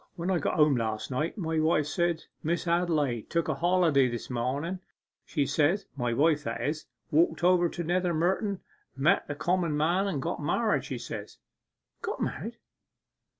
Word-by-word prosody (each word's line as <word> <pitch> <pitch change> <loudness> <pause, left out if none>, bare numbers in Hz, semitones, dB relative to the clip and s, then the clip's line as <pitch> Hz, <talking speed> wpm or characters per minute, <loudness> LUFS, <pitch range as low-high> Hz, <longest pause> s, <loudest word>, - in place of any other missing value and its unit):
When 175 +2 -2
I 180 - +2
got - - -1
home 150 -4 +4
last 110 +1 -2
night 150 - -1
my 160 -4 -1
wife 155 -1 +3
said, 170 +2 0 0.2
"Miss 170 +3 -1
Adelaide 155 -9 +1
took 170 -1 0
a 155 - +1
holiday 165 -3 +3
this 120 +1 -5
mornen," 140 +9 -2 0.5
says 145 +5 +2
she - - -26
(my 120 -3 -1
wife, 150 +4 +3
that 115 -2 -3
is); 150 +6 -2 0.2
"walked 165 +3 +3
over 175 -1 +4
to 175 - -4
Nether 180 +2 +1
Mynton, 190 +4 0 0.4
met 135 +3 +3
the 145 - -4
comen 170 -1 0
man, 175 +6 +2
and 185 -8 -1
got - - -3
married!" - - +1
says - - -6
she.' - - -25 0.6
'Got - - -3
married! - - -3
160 Hz, 170 wpm, -28 LUFS, 140-175 Hz, 0.6 s, home